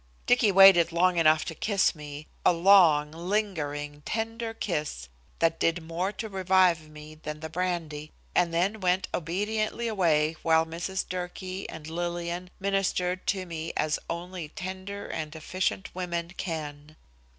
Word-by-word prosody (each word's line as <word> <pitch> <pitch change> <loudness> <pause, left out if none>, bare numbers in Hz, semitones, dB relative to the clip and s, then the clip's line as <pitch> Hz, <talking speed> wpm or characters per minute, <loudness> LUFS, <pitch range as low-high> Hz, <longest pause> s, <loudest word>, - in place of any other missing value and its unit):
Dicky 245 -4 +4
waited 190 -3 +8
long 175 +1 +3
enough 155 -1 +4
to - - -4
kiss 200 +3 +1
me, 150 -1 -9 0.2
a - - +6
long, 170 -4 +5
lingering, 160 -5 -2
tender 225 +3 -3
kiss 150 - -3 0.3
that 165 0 +1
did 165 0 +1
more 170 +4 -2
to 220 - -5
revive 185 -5 +2
me 150 0 -11
than 150 -1 -7
the 160 0 -7
brandy, 165 -4 -3 0.2
and 175 -1 +2
then 185 +6 0
went 185 0 +1
obediently 215 +7 -1
away 165 -7 +2
while 160 0 +3
Mrs. 170 +4 -3
Durkee 185 +1 -5
and 160 -1 -8
Lillian 175 +2 -3
ministered 190 -2 0
to 190 -2 0
me 165 -1 -5
as 155 -1 +1
only 170 -1 -5
tender 190 +4 -6
and 155 0 -5
efficient 185 +4 -2
women 170 -2 -3
can. 155 -4 -5
175 Hz, 140 wpm, -28 LUFS, 160-190 Hz, 0.3 s, waited